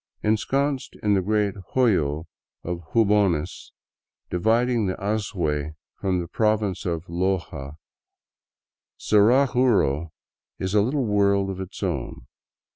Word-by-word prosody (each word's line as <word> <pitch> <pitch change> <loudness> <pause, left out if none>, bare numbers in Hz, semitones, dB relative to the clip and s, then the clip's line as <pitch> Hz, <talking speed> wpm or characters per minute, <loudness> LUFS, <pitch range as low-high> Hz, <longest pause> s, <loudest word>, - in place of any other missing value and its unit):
Ensconced 135 +6 0
in 105 -1 +3
the 95 - +3
great 105 +1 +1 0.2
hoyo 80 - +2 0.4
of 85 0 -3
Jubones, 100 -7 +1 0.6
dividing 115 +4 +2
the 95 - -1
Azuay 95 -8 -2
f 80 - -10 0.3
torn 95 -2 +1
the 85 - -4
province 105 -2 0
of 85 -1 -2
Loja, 85 -6 -2 1.2
Zaraguro 110 - +3 0.5
is 95 +1 -3
a 105 - +5
little 130 +5 0
v^^orld 100 -2 +2
of 95 0 -6
its 95 - -7
own. - - -3
100 Hz, 115 wpm, -24 LUFS, 90-110 Hz, 1.2 s, a